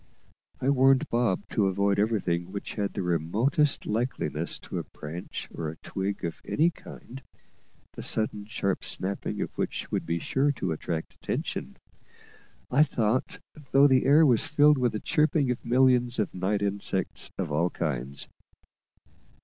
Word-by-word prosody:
I 135 Hz, -, +2 dB
warned 135 Hz, +2 st, +4 dB
Bob 115 Hz, -5 st, 0 dB
to 100 Hz, -3 st, +2 dB
avoid 100 Hz, +1 st, +1 dB
everything 95 Hz, -5 st, 0 dB
which 100 Hz, 0 st, -5 dB
had 100 Hz, -2 st, -2 dB
the -, -, -3 dB
remotest 105 Hz, -, +1 dB
likeness 120 Hz, +4 st, -2 dB
to -, -, -5 dB
a -, -, -4 dB
branch 80 Hz, +4 st, -7 dB
or 80 Hz, -1 st, -5 dB
twig 95 Hz, -1 st, -3 dB
of 85 Hz, -, -5 dB
any 165 Hz, +3 st, +2 dB
kind, 135 Hz, -4 st, -11 dB, 0.7 s
the -, -, -7 dB
sudden 110 Hz, -2 st, 0 dB
sharp 100 Hz, -3 st, -1 dB
snapping 100 Hz, +2 st, -2 dB
of -, -, -4 dB
which -, -, -3 dB
would -, -, -2 dB
be 85 Hz, 0 st, 0 dB
sure 135 Hz, -, +1 dB
to 115 Hz, -, -3 dB
attract 80 Hz, +1 st, -4 dB
attention, -, -, -4 dB, 0.9 s
I 140 Hz, +4 st, +5 dB
thought, 125 Hz, -4 st, +1 dB, 0.3 s
though 135 Hz, +1 st, +6 dB
the 130 Hz, -2 st, +4 dB
air 150 Hz, +3 st, +7 dB
was 120 Hz, -6 st, +4 dB
filled 150 Hz, -1 st, +4 dB
with 125 Hz, -2 st, +1 dB
the 105 Hz, -, -2 dB
chirping 150 Hz, -, +2 dB
of 125 Hz, -, -4 dB
millions 125 Hz, 0 st, +3 dB
of 105 Hz, -, -1 dB
night 100 Hz, +3 st, -1 dB
insects 100 Hz, -2 st, -1 dB
of -, -, -3 dB
all 85 Hz, +4 st, +2 dB
kinds. 70 Hz, -5 st, -4 dB
105 Hz, 150 wpm, -27 LUFS, 95-130 Hz, 0.9 s, air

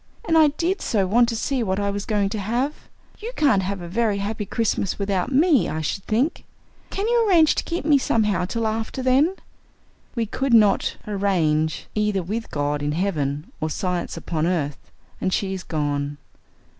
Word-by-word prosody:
'And 325 Hz, -, +2 dB
I 315 Hz, -1 st, +7 dB
did 335 Hz, +6 st, -1 dB
so 200 Hz, -4 st, +1 dB
want 235 Hz, +5 st, +3 dB
to 230 Hz, -, -2 dB
see 260 Hz, +3 st, -1 dB
what 190 Hz, -3 st, 0 dB
I 200 Hz, 0 st, 0 dB
was 200 Hz, 0 st, -4 dB
going 205 Hz, -3 st, +1 dB
to 215 Hz, +1 st, -3 dB
have. 240 Hz, +8 st, -1 dB, 0.5 s
You 455 Hz, +3 st, -5 dB
can't 265 Hz, -10 st, +3 dB
have 190 Hz, 0 st, -3 dB
a 175 Hz, -, -6 dB
very 210 Hz, +2 st, 0 dB
happy 205 Hz, +1 st, -3 dB
Christmas 210 Hz, -4 st, -1 dB
without 200 Hz, +2 st, -1 dB
me, 295 Hz, 0 st, +4 dB
I 155 Hz, +1 st, -3 dB
should 190 Hz, +5 st, -3 dB
think. 255 Hz, +10 st, 0 dB, 0.5 s
Can 400 Hz, +2 st, -2 dB
you 465 Hz, -2 st, +3 dB
arrange 325 Hz, -4 st, +5 dB
to -, -, -2 dB
keep 335 Hz, -3 st, -4 dB
me 295 Hz, -3 st, +5 dB
somehow 210 Hz, -7 st, +1 dB
till 230 Hz, +5 st, -2 dB
after 225 Hz, +4 st, -2 dB
then?' 275 Hz, +8 st, +3 dB, 0.8 s
We 230 Hz, -2 st, 0 dB
could 260 Hz, +3 st, +1 dB
not 210 Hz, -3 st, +3 dB
'arrange' 170 Hz, -7 st, 0 dB
either 210 Hz, -3 st, 0 dB
with 220 Hz, +6 st, -4 dB
God 145 Hz, 0 st, -1 dB
in 145 Hz, 0 st, -1 dB
heaven 150 Hz, -5 st, -2 dB
or 155 Hz, -, 0 dB
science 180 Hz, +1 st, -2 dB
upon 160 Hz, -1 st, -2 dB
earth, 150 Hz, -6 st, -2 dB, 0.3 s
and 185 Hz, -, 0 dB
she 195 Hz, 0 st, -1 dB
is 190 Hz, -, -4 dB
gone." 145 Hz, -3 st, -2 dB
205 Hz, 185 wpm, -23 LUFS, 180-255 Hz, 0.8 s, I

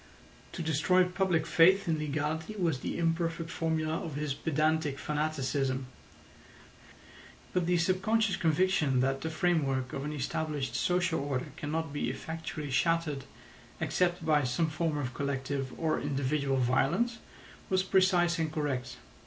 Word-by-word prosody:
To 170 Hz, -, -4 dB
destroy 160 Hz, +4 st, +3 dB
public 180 Hz, -3 st, +1 dB
faith 175 Hz, +5 st, +5 dB
in 160 Hz, -2 st, +1 dB
legality 155 Hz, +5 st, -2 dB
was 170 Hz, -9 st, 0 dB
the -, -, -4 dB
imperfect 165 Hz, 0 st, -1 dB
formula 160 Hz, -1 st, -1 dB
of 160 Hz, -4 st, -5 dB
his 150 Hz, -1 st, -1 dB
pedantic 155 Hz, -1 st, 0 dB
fanaticism; 140 Hz, -3 st, -1 dB, 1.7 s
but 180 Hz, -2 st, +1 dB
the 180 Hz, 0 st, +3 dB
subconscious 195 Hz, +5 st, +2 dB
conviction 160 Hz, -5 st, +2 dB
that 135 Hz, +1 st, 0 dB
the 160 Hz, -, -2 dB
framework 150 Hz, -6 st, 0 dB
of 135 Hz, -, -3 dB
an 150 Hz, -, -3 dB
established 150 Hz, 0 st, -2 dB
social 175 Hz, -2 st, +1 dB
order 140 Hz, 0 st, -3 dB
cannot 155 Hz, 0 st, -3 dB
be 145 Hz, -5 st, -1 dB
effectually 150 Hz, +1 st, -5 dB
shattered 160 Hz, -1 st, +1 dB, 0.5 s
except 175 Hz, -2 st, 0 dB
by 150 Hz, -2 st, +3 dB
some 155 Hz, +6 st, 0 dB
form 155 Hz, -1 st, -1 dB
of 130 Hz, -3 st, -3 dB
collective 135 Hz, -1 st, -2 dB
or 160 Hz, -1 st, +1 dB
individual 140 Hz, -1 st, 0 dB
violence 170 Hz, -, +1 dB, 0.5 s
was 185 Hz, 0 st, +2 dB
precise 180 Hz, -3 st, +3 dB
and 160 Hz, -1 st, 0 dB
correct. 135 Hz, -5 st, -2 dB
155 Hz, 135 wpm, -30 LUFS, 140-170 Hz, 1.7 s, faith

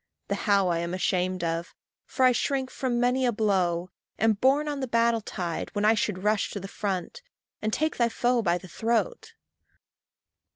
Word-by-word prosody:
The -, -, +1 dB, 0.2 s
how 200 Hz, -2 st, +4 dB
I 170 Hz, -1 st, +1 dB
am 170 Hz, +1 st, -3 dB
ashamed 185 Hz, -1 st, 0 dB
of; 165 Hz, +1 st, -3 dB, 0.3 s
for 260 Hz, -, +2 dB
I 255 Hz, -, +7 dB
shrink 265 Hz, +1 st, -1 dB
From 245 Hz, -3 st, -1 dB
many 250 Hz, +2 st, +2 dB
a 245 Hz, -, +3 dB
blow 185 Hz, -5 st, 0 dB, 0.3 s
am 225 Hz, +1 st, +3 dB
borne 270 Hz, +8 st, +2 dB
on 290 Hz, -1 st, -2 dB
the 260 Hz, -, -2 dB
battle 230 Hz, -1 st, +2 dB
tide, 175 Hz, -5 st, -4 dB
When 205 Hz, 0 st, +1 dB
I 220 Hz, -, +6 dB
should 210 Hz, -4 st, -1 dB
rush 210 Hz, 0 st, +1 dB
to 200 Hz, -, -4 dB
the 195 Hz, -, -7 dB
front, 195 Hz, -, -4 dB, 0.4 s
and 215 Hz, -, -1 dB
take 310 Hz, +6 st, 0 dB
thy 235 Hz, -1 st, +3 dB
foe 245 Hz, +1 st, +1 dB
by 175 Hz, -4 st, +1 dB
the 185 Hz, -, -11 dB
throat. 235 Hz, -, -1 dB
215 Hz, 190 wpm, -27 LUFS, 185-245 Hz, 0.4 s, I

